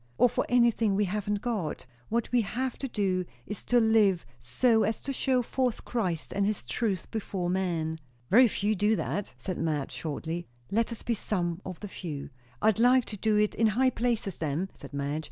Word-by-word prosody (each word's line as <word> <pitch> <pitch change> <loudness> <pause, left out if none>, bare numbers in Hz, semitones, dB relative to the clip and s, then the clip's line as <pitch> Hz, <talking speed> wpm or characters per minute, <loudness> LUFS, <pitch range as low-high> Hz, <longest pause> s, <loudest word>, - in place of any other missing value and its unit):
or - - +6
for - - -1
anything 235 -4 +3
we 205 +1 +2
haven't 205 +1 -2
got. 215 - -2 0.2
What 235 +1 -1
we 245 -1 +4
have 245 +5 -2
to 270 - -2
do, 195 -6 0 0.2
is 210 - -6
to 245 - +4
live 220 -5 +4 0.2
so 220 - +3
as 220 - 0
to 275 - -2
show 255 -1 +1
forth 250 -1 -1
Christ 185 -10 -2
and 200 - +1
his 205 -5 0
truth 190 - -2
before 190 -5 -2
men." 165 -4 -1 0.3
"Very 245 +5 +8
few 210 0 0
do 210 +3 +3
that," 205 -1 -3
said 185 - -4
Madge 150 -4 -1
shortly. 165 +2 -4 0.2
"Let 230 +3 +1
us 230 - -7
be 240 - 0
some 180 -5 -2
of 185 -3 -7
the 205 - -5
few." 155 -8 -6 0.3
"I'd 220 0 +4
like 250 +1 +5
to 215 - -6
do 215 +1 +2
it 210 0 +2
in 225 - +3
high 255 +5 +3
places, 230 -6 -1
then," 160 +5 -2
said - - -12
Madge. 140 +1 -2
210 Hz, 195 wpm, -29 LUFS, 175-230 Hz, 0.3 s, Very